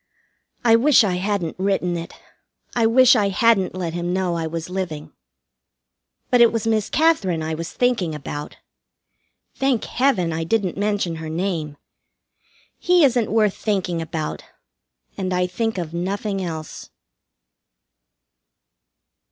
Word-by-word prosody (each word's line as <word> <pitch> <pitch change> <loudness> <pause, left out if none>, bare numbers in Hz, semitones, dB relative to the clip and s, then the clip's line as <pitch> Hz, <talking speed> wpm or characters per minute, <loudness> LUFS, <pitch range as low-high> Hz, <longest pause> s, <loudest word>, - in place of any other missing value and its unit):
I 230 -1 +6
wish 270 +1 +5
I 185 -4 0
hadn't 185 -3 -2
written 190 -2 0
it. 170 0 -6 0.6
I 230 -2 +3
wish 255 +2 +6
I 205 -4 +2
hadn't 195 -2 +2
let 175 -3 -3
him 175 0 -2
know 185 -1 0
I 165 -1 -2
was 165 0 -5
living. 180 -5 -5 1.2
But 245 -1 +5
it 235 - +7
was 230 -1 -2
Miss 220 -2 0
Katherine 255 - +2
I 160 0 -3
was 165 +2 -5
thinking 230 -11 0
about. 145 0 -7 1.0
Thank 270 -4 0
Heaven, 210 -11 +1
I 165 +1 -2
didn't 190 +1 0
mention 200 -4 -1
her 160 -1 -6
name! 160 -3 -3 1.0
He 355 -2 +4
isn't 245 -4 +1
worth 215 -3 +3
thinking 185 -5 -2
about, 160 -1 -4 0.8
and 185 -1 -2
I 180 0 +1
think 225 +4 -2
of 170 -3 -4
nothing 195 +3 -2
else. 160 -3 -7
190 Hz, 135 wpm, -21 LUFS, 170-225 Hz, 1.2 s, it